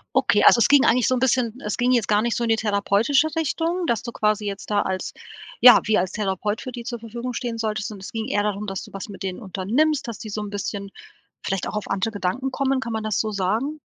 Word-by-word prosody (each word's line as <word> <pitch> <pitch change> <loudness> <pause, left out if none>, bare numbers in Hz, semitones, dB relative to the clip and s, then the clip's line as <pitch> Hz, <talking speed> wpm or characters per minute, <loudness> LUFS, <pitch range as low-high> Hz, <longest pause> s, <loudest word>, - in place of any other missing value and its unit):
Okay, - - +3
also, - - +7
es 225 - +5
ging 285 -2 +6
eigentlich 240 0 +3
so 255 - +2
'n - - -1
bisschen 250 -1 0
es 210 - -2
ging 245 +1 +2
jetzt 235 -4 +2
gar 210 0 +4
nicht 235 +1 0
so 240 - -1
in 230 - -1
die 225 - +3
therapeutische 215 +7 +2
Richtung, 330 +4 -1
dass 235 -1 0
du 235 - -5
quasi 210 -1 0
jetzt 200 +1 -5
da 205 -1 +2
als 190 0 -3 0.5
ja, 245 -1 +10
wie 215 0 +3
als 180 0 0
Therapeut 205 +1 -2
für 255 - -7
die 240 -1 -6
zur 240 0 -5
Verfügung 235 +2 -6
stehen 240 -1 -3
solltest, 215 -2 -2
sondern 205 -3 -9
es - - -8
ging 225 0 -4
eher 205 -6 0
darum, 210 0 -2
dass 195 -1 -4
du - - -13
was 195 - -7
mit 195 -2 -9
denen 185 -1 -4
unternimmst, 240 - 0
dass 225 - -7
die 215 - -7
so 210 +1 -3
'n 210 - -5
bisschen 200 0 -4 0.5
vielleicht 195 -1 -2
auch - - -3
auf 210 - -5
andere 195 +3 -1
Gedanken 215 +7 -2
kommen. 270 0 0
Kann 235 - -4
man 220 -1 -2
das 215 -2 -1
so 220 - -3
sagen? 215 +10 -1
220 Hz, 265 wpm, -23 LUFS, 205-245 Hz, 0.5 s, ja